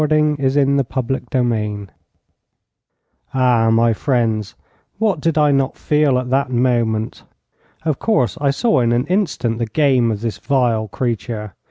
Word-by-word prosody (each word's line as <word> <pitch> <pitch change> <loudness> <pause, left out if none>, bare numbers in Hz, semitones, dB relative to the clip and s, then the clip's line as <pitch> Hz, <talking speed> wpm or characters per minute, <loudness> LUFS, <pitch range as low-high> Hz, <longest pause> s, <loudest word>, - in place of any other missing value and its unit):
A - - +2
prisoner 150 0 +2
is 135 +1 +1
escaping!' 125 -6 -1 1.5
Ah, 125 -3 +3
my 115 +1 +3
friends, 110 -5 -1 0.4
what 205 -7 0
did 165 0 0
I 150 -1 +4
not 135 -1 0
feel 150 -3 +2
at 125 0 -3
that 135 0 +1
moment! 120 -3 0 0.6
Of 155 -3 -1
course, 215 - +1
I 140 - +2
saw 220 - +1
in 120 -1 +2
an 120 +2 +1
instant 150 - -1
the 115 - -1
game 130 -1 +2
of 105 -2 -3
this 115 -4 -4
vile 120 -5 0
creature. 115 -3 -4
125 Hz, 145 wpm, -18 LUFS, 115-140 Hz, 1.5 s, I